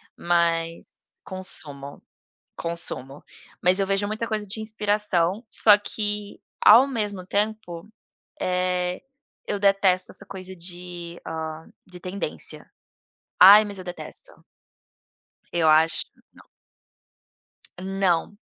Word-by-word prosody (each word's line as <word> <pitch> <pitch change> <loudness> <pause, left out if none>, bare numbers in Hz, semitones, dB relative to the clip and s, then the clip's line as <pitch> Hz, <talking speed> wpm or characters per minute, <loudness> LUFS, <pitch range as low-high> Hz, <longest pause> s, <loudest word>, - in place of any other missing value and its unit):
mas 170 -1 -1
consumo 145 -7 -7 0.5
consumo. 150 -5 -5 0.4
Mas 185 +2 +4
eu 195 - +1
vejo 195 +1 0
muita 215 +2 -3
coisa 215 -2 -2
de 220 +3 -5
inspiração, 210 -2 0
só 210 -2 +6
que 210 -1 -3 0.2
ao 235 +5 +8
mesmo 205 -7 -3
tempo, 205 -3 -2 0.5
eh, 180 0 -1 0.5
eu 205 -1 -2
detesto 195 -2 +3
essa - - -3
coisa 190 -1 -8
de, 175 0 -7
ah, 160 0 -6 0.2
de 180 -1 -13
tendência. 185 +3 -5 0.7
Ai 205 +4 +10
mas 200 -2 -7
eu 185 - -8
detesto. 345 - -10 1.1
Eu 170 -2 +2
acho, 155 +1 +4
que - - -31
não. - - -19 1.3
Não. 190 0 0
185 Hz, 105 wpm, -24 LUFS, 170-205 Hz, 1.3 s, Ai